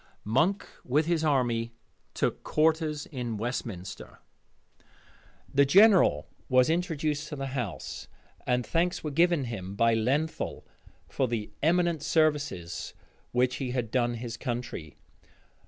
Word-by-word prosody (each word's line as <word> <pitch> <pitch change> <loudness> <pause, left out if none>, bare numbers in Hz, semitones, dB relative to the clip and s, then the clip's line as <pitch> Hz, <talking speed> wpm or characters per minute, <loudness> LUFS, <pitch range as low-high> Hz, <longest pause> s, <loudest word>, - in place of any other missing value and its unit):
Monk 155 - +1 0.2
with 145 +5 +1
his 165 -1 +1
army 120 -6 +1 0.4
took - - -1
quarters 155 -1 +1
in 120 -6 -4
Westminster. 110 -5 -5 1.4
The 140 - +5
general 195 +7 +5 0.2
was 130 +3 +4
introduced 155 -3 -1
to 150 - -6
the 135 -1 -4
House; 120 - -5 0.4
and 125 -1 +1
thanks 175 +2 0
were 150 - -3
given 170 0 +3
him 100 -6 -5
by 115 +2 +3
Lenthal, 135 +8 -1 0.4
for 130 - 0
the 115 -3 -3
eminent 170 0 +2
services 145 - 0 0.4
which 125 +1 +1
he 130 -3 -3
had 120 -4 -2
done 120 -2 +1
his 115 0 -6
country. 120 - -5
130 Hz, 125 wpm, -28 LUFS, 115-155 Hz, 1.4 s, The